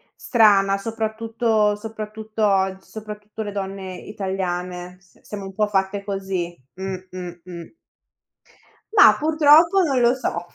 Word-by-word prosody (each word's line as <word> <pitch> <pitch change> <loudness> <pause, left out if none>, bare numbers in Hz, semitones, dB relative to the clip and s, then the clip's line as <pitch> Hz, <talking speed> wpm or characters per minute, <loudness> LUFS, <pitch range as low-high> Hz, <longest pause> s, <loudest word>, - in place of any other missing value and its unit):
strana, 200 -4 +4
soprattutto 220 0 0
soprattutto 215 0 -6
og 190 -1 +2
soprattutto 210 0 -9
le 205 - -5
donne 195 -1 -5
italiane. 180 -3 -4
S 195 -2 -27
siamo 200 -2 -7
un 195 - -8
po' 210 +1 +1
fatte 200 0 -1
così. 190 -3 -3 0.2
Mh, 190 0 -4
mh, 175 -1 -8
mh. 175 - -10 1.2
Mah, 395 - +8
purtroppo 315 +4 +5
non 275 -7 +1
lo 240 0 +5
so. 175 -9 -3
205 Hz, 125 wpm, -22 LUFS, 190-220 Hz, 1.2 s, Mah